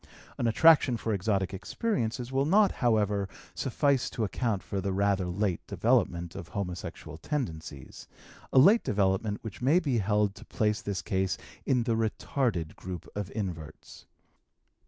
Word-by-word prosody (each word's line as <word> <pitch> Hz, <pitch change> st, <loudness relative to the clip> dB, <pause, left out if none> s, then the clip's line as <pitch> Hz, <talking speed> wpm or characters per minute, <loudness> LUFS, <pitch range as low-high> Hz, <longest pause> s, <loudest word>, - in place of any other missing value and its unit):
An 120 Hz, -, +1 dB
attraction 135 Hz, 0 st, +5 dB
for 110 Hz, 0 st, -2 dB
exotic 95 Hz, -1 st, 0 dB
experiences 120 Hz, -, -2 dB
will 135 Hz, +2 st, +1 dB
not, 200 Hz, +4 st, +5 dB
however, 105 Hz, -4 st, +1 dB, 0.2 s
suffice 140 Hz, 0 st, +1 dB
to 115 Hz, -, -3 dB
account 105 Hz, -1 st, -1 dB
for 100 Hz, -, -3 dB
the 100 Hz, -, -2 dB
rather 100 Hz, -1 st, +1 dB
late 90 Hz, 0 st, -1 dB
development 90 Hz, -8 st, +1 dB
of 95 Hz, -3 st, -8 dB
homosexual 90 Hz, -5 st, -6 dB
tendencies, 80 Hz, -, -5 dB, 0.4 s
a -, -, +1 dB
late 200 Hz, -, +7 dB
development 100 Hz, +1 st, 0 dB
which 110 Hz, 0 st, -8 dB
may 140 Hz, +7 st, +4 dB
be 140 Hz, -9 st, 0 dB
held 105 Hz, 0 st, +1 dB
to -, -, -13 dB
place 105 Hz, -1 st, 0 dB
this 100 Hz, -2 st, -3 dB
case 95 Hz, -3 st, 0 dB, 0.3 s
in 125 Hz, -3 st, +3 dB
the 115 Hz, -1 st, 0 dB
retarded 110 Hz, -, -1 dB
group 90 Hz, -1 st, -7 dB
of 105 Hz, -3 st, -3 dB
inverts. 80 Hz, -7 st, -6 dB
105 Hz, 145 wpm, -29 LUFS, 95-125 Hz, 0.4 s, late